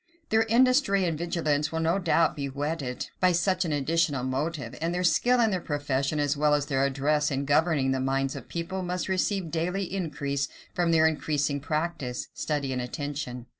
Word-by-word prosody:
Their 220 0 +3
industry 240 -4 +4
and 165 -2 0
vigilance 155 -3 -1
will 160 - -2
no 165 +4 +1
doubt, 165 -3 +2
be 140 -1 -3
whetted 140 -2 -3
by 185 -1 +4
such 185 +1 +1
an 165 - -2
additional 145 -2 +1
motive; 145 +4 -3
and 170 +2 -1
their 180 - -1
skill 210 +10 +3
in 225 -2 +3
their 185 -2 -1
profession, 145 -1 -1
as 145 0 +1
well 150 0 +3
as 145 -1 0
their 135 -2 0
address 145 +2 +1
in 140 -1 -2
governing 145 -2 +2
the 135 - 0
minds 135 +1 0
of - - -7
the - - -29
people, 170 +3 -3
must 180 0 -3
receive 190 -2 0
daily 180 +4 -1
increase 145 -6 -2 0.3
from 175 -1 +1
their 160 -1 +5
increasing 150 -2 0
practice, 150 -4 -3
study, 145 -3 -2
and 125 - -2
attention. 125 -1 -5
155 Hz, 190 wpm, -27 LUFS, 140-175 Hz, 0.3 s, their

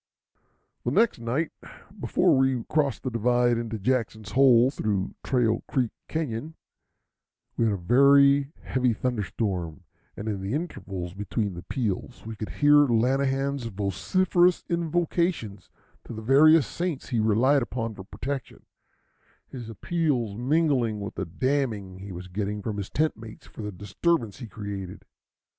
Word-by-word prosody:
The - - 0
next 230 - +2
night, 125 +8 -1 0.5
before - - +3
we 130 -2 +2
crossed 145 -5 0
the 130 - -2
divide 120 +1 +2
into 115 -1 -4
Jackson's 110 -1 -1
Hole 130 -1 +5
through 100 -8 -2
Trail 115 -4 +1
Creek 125 -5 0 0.2
Cañon, 155 -1 -3 1.0
we 115 - +1
had 110 - +2
a - - -4
very 140 +7 +5
heavy 125 -2 +1
thunder 120 0 -1
storm, 90 -5 -3 0.3
and 105 - -6
in 100 -3 -2
the 100 +7 -2
intervals 95 - -5
between 100 +1 -2
the 85 - -7
peals 115 +2 -4
we 110 0 -6
could 110 0 -6
hear 145 0 +5
Lanahan's 135 +2 +1
vociferous 175 - +1
invocations 170 - -1 0.4
to - - -8
the 110 0 -7
various 150 +5 +6
saints 170 -5 -4
he 120 -4 0
relied 120 +6 +3
upon 115 -2 -3
for 95 - -9
protection, 135 +6 -6 0.8
his 120 -4 -8
appeals 125 - -1
mingling 125 -3 +1
with 100 -1 -5
the 95 - -4
damning 105 - -2
he 100 +1 -8
was 90 +1 -7
getting 100 +2 -3
from 105 -1 -3
his 100 -1 -4
tent 155 +2 +1
mates 110 -1 -12
for - - -11
the 105 -1 -4
disturbance 105 - -1
he 120 - -7
created. 100 -3 -7
120 Hz, 145 wpm, -26 LUFS, 105-140 Hz, 1.0 s, various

